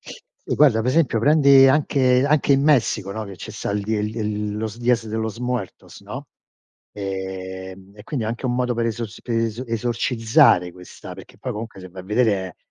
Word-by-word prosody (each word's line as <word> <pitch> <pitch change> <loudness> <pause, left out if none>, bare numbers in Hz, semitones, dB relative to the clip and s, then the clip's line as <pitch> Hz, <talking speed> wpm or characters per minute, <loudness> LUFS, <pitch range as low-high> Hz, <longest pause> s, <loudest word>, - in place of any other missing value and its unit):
Sì - - -8
guarda, 135 -7 +4
per 120 +3 0
esempio, 140 -5 +2
prendi 140 -1 +6
anche 130 -2 +3
anche 145 -1 +3
in 135 0 +3
Messico, 115 -9 +2
no, 110 +1 -5
che 100 -2 -10
ce 110 - -9
sta 105 - -4
el 105 0 -1
di 110 +2 -2
el 105 0 -2
d 110 - -11
el 105 -1 -3
los 110 +1 -4
Días 120 -1 +1
de 110 - -4
los 110 0 -3
muertos, 125 -5 -5
no? - - -8 0.7
Ehm, 95 -1 -6
e 105 - -12
quindi 130 -7 -3
è 110 - -2
anche 120 +3 -4
un 120 - 0
modo 125 0 0
per 115 0 -1
eso 115 +1 -2 0.2
per 120 -2 -2
es 115 +2 -2
esorcizzare 115 - +2
questa 90 0 -11
perché - - -13
poi - - -5
comunque 110 -2 -7
se 95 - -10
vai 90 +1 -10
a - - -17
vedere 100 -4 0
115 Hz, 210 wpm, -22 LUFS, 100-125 Hz, 0.7 s, prendi